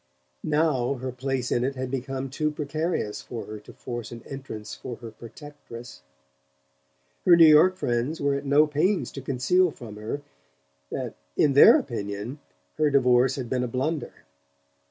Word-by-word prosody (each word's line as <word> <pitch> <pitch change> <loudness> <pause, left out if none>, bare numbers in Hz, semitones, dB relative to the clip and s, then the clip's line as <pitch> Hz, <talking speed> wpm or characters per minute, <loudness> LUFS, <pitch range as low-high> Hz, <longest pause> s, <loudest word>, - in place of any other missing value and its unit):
Now 150 -4 +1
her 130 0 -5
place 130 0 -3
in 120 - +1
it 135 +2 -1
had 130 -1 -4
become 135 0 -4
too 155 +2 0
precarious 150 -6 -3
for 120 - -7
her 110 0 -8
to 105 - -14
force 120 -2 -7
an 115 -1 -9
entrance 135 -6 -7
for 120 - -7
her 115 -1 -10
protectress. 120 - -11 1.2
Her 175 - +7
New 170 -1 +8
York 155 +4 +7
friends 125 0 -1
were 140 0 +1
at 140 0 -2
no 145 +2 +5
pains 155 +7 0
to 135 - -7
conceal 140 +8 +2
from 115 -8 -10
her 110 +7 -5 0.7
that - - -4 0.2
in 145 - +4
their 140 - +9
opinion 105 +2 -5 0.4
her 155 -1 +4
divorce 125 -1 +4
had 130 -3 -4
been 125 +1 -1
a - - -1
blunder. 130 +4 -3
135 Hz, 160 wpm, -26 LUFS, 120-150 Hz, 1.2 s, their